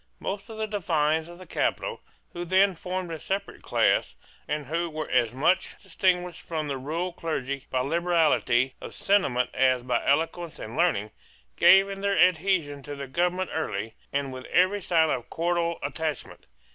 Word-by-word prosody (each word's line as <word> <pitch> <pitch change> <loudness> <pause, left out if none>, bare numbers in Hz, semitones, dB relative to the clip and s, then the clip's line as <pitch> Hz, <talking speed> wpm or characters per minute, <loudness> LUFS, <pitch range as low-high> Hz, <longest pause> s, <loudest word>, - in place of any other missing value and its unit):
Most 200 +3 -5
of 220 - -8
the 220 - -1
divines 160 -6 0
of 175 - -11
the 185 - -11
capital, 480 - -2 0.3
who 175 - -4
then 190 +3 +4
formed 180 0 -4
a 160 - -5
separate 195 +5 -4
class, - - +1 0.3
and 150 -1 -2
who 165 +5 -1
were 155 -1 -5
as 120 -3 +3
much 150 +9 +1
distinguished 180 -2 0
from 155 -2 -3
the 135 -2 -3
rural 165 +7 -3
clergy 140 -5 -4
by 130 - 0
liberality 155 -5 +2
of - - -8
sentiment 190 -12 +1
as 130 -2 +2
by 125 0 0
eloquence 165 +2 0
and 110 +3 -7
learning, 130 - +1 0.4
gave 195 - +7
in 195 0 -6
their 200 -1 +1
adhesion 170 -5 +2
to 145 +1 -7
the 140 0 -6
government 180 +6 -1
early, 110 -8 -3 0.2
and 140 -1 -2
with 130 0 -8
every 185 +3 +2
sign 160 -3 +3
of 120 0 -3
cordial 170 0 0
attachment. 150 +1 -4
165 Hz, 170 wpm, -26 LUFS, 140-180 Hz, 0.4 s, gave